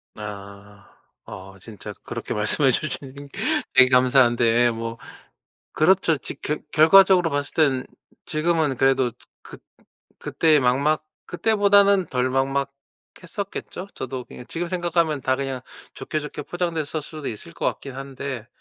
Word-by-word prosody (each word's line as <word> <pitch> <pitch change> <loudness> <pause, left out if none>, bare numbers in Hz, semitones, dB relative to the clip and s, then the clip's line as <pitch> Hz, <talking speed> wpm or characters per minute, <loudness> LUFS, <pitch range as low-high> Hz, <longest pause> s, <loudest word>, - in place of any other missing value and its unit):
아. 100 -1 -10 0.4
어 95 +1 -10
진짜 105 +1 -10
그렇게 - - -5
말씀해 130 +6 +3
주신 135 0 -3 0.6
되게 130 -1 +7
감사한데, 120 -2 +4
뭐 115 0 -5 0.8
그렇죠. 165 -1 +3
지 140 - -9
겨 150 - -2 0.2
결과적으로 180 +2 +6
봤을 145 0 -3
땐 135 -5 +2 0.4
지금은 155 -3 0
그래도 135 -2 +3 0.3
그 - - -12 0.6
그때 160 -2 +2
막막 140 +5 +2 0.2
그때보다는 200 -1 +3
덜 125 -3 -1
막막했었겠죠? 140 +8 -5
저도 130 0 -5
그냥 125 - -12
지금 170 +1 -4
생각하면 170 -4 0
다 130 0 0
그냥 135 -1 -4 0.4
좋게, 155 +3 -4
좋게 150 - -7
포장됐었 165 -4 -3
수도 155 -2 -8
있을 105 - -7
것 - - -5
같긴 135 - -3
한데 135 -3 -6
140 Hz, 275 characters per minute, -23 LUFS, 125-165 Hz, 0.8 s, 되게